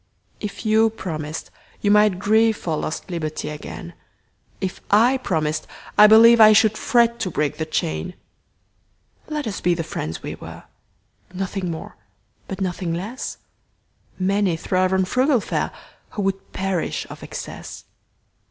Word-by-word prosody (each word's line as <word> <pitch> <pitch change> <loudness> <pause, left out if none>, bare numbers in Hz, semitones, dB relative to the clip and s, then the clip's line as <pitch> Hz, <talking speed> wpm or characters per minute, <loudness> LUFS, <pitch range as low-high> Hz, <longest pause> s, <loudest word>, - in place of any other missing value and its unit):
If 210 +2 -6
you 220 +1 +4
promised, 160 -7 -6 0.3
you 205 - +2
might 210 -2 +5
grieveFor 215 -5 +2
lost 160 - -5
liberty 155 -3 -3
again:If 170 +4 -9
I 235 +6 +5
promised, 155 -9 -1 0.3
I 210 - +9
believeI 220 0 +8
should 220 0 +4
fret 235 +1 +2
to 210 -5 -1
break 150 -3 -1
the 160 - -3
chain. 80 - -2 1.1
Let 300 -2 -3
us 210 -3 -4
be 175 -1 +2
the 165 - -3
friends 80 - -5
we - - -4
were, - - -10 0.7
Nothing 190 -1 -3
more 160 -1 -7 0.5
but 195 0 -6
nothing 175 -2 -2
less:Many 195 -2 -4
thrive 185 +2 +1
on 190 0 +2
frugal 255 +6 +2
fareWho - - -2 0.5
would 195 0 -2
perish 190 -3 -2
of - - -10
excess. - - -8
195 Hz, 125 wpm, -22 LUFS, 170-220 Hz, 1.1 s, I